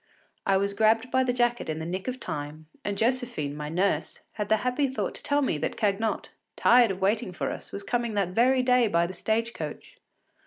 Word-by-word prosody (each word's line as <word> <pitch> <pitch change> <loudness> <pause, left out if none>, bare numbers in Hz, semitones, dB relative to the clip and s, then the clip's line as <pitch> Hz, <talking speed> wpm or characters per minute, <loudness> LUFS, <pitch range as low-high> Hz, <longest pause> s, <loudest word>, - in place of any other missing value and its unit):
I 195 -1 +4
was 200 +1 0
grabbed 225 +4 +2
by 260 0 +3
the 255 - +1
jacket 240 -4 0
in 155 - -2
the 160 - -4
nick 185 +5 -4
of 255 0 -3
time, 150 - -5 0.2
and 205 -1 -2
Josephine, 235 - -1
my 150 0 -5
nurse, 185 +5 -1
had 210 -2 -4
the 220 - +4
happy 255 +3 +1
thought 265 - -3
to - - -6
tell 290 0 +1
me 160 - 0
that - - -3
Cagnotte, 215 0 0 0.3
tired 240 -1 +5
of 190 0 -4
waiting 200 0 +1
for 180 - -3
us, - - -8
was 200 - -6
coming 235 +1 -1
that 195 -3 +1
very 250 +6 +3
day 250 -2 +4
by 170 -4 +2
the 180 - -5
stage 225 +5 -1
coach. - - -7
220 Hz, 220 wpm, -27 LUFS, 185-245 Hz, 0.3 s, tired